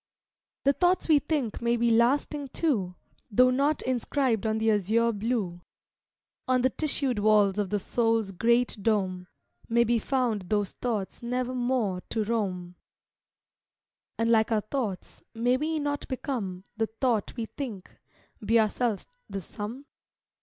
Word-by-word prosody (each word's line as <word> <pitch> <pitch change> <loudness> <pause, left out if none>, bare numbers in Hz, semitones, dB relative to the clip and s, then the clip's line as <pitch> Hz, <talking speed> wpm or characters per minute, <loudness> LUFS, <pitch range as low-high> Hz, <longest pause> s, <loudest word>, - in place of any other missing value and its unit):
The 280 - +4
thoughts 360 +3 +2
we 310 -3 +6
think 285 -6 -2
may 235 0 +2
be 235 0 +2
lasting, 275 +5 +2
too, 225 - -1 0.3
Though 250 +4 +5
not 280 +4 +1
inscribed 250 -2 0
on 220 0 0
the 220 0 +2
azure 220 +3 +2
blue; 205 -5 -2 0.9
On 255 -1 +3
the 260 +1 +2
tissued 275 -6 0
walls 205 -1 +4
of 200 -2 -1
the 210 - +1
soul's 225 0 0
great 235 +5 +2
dome, 190 -4 0 0.4
May 235 +1 +4
be 235 0 +2
found 225 -7 -1
those 205 -2 +1
thoughts 220 -6 -3
ne'er 250 +1 -2
more 240 -7 0
to 220 - 0
roam. 185 -5 -2 1.4
And 230 0 +1
like 220 0 +3
our 215 -1 +2
thoughts, 215 -5 -4
may 245 +2 +2
we 310 +4 -1
not 290 -1 -2
become 220 -9 -4
The 225 0 +1
thought 225 -1 -1
we 230 - -2
think, 220 -7 -7 0.5
be 225 +2 +4
ourselves 220 -1 0 0.2
the 195 - -4
sum? 215 +8 -7
230 Hz, 145 wpm, -27 LUFS, 210-255 Hz, 1.4 s, we